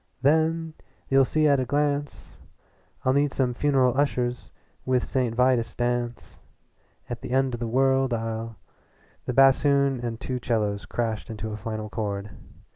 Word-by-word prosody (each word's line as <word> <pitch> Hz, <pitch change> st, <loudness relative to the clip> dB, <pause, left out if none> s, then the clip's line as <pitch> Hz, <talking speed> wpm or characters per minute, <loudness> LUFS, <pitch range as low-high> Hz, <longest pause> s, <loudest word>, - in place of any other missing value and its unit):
"Then 160 Hz, +2 st, +2 dB, 0.4 s
you'll 135 Hz, 0 st, +5 dB
see 155 Hz, +3 st, +2 dB
at 140 Hz, -2 st, +4 dB
a 130 Hz, -, 0 dB
glance 145 Hz, +1 st, -2 dB, 0.7 s
I'll 130 Hz, -, +3 dB
need 145 Hz, 0 st, +2 dB
some 130 Hz, -3 st, 0 dB
funeral 130 Hz, -1 st, +2 dB
ushers 125 Hz, -3 st, -1 dB, 0.3 s
with 130 Hz, -1 st, +1 dB
St. 125 Hz, -4 st, -1 dB
Vitus 125 Hz, -1 st, +2 dB
dance 120 Hz, 0 st, -3 dB, 0.7 s
At -, -, -6 dB
the -, -, -7 dB
end 130 Hz, 0 st, +1 dB
of 120 Hz, -, -4 dB
the 120 Hz, -, -3 dB
world 135 Hz, +2 st, +2 dB
I'll 115 Hz, 0 st, -3 dB, 0.3 s
" -, -, -34 dB
The 125 Hz, -, -1 dB
bassoon 135 Hz, 0 st, +4 dB
and 120 Hz, -1 st, -4 dB
two 130 Hz, -1 st, -3 dB
cellos 105 Hz, -4 st, -1 dB
crashed 115 Hz, -2 st, -3 dB
into 110 Hz, 0 st, -5 dB
a -, -, -4 dB
final 110 Hz, 0 st, -5 dB
chord. 105 Hz, -2 st, -4 dB
125 Hz, 155 wpm, -25 LUFS, 115-135 Hz, 0.7 s, you'll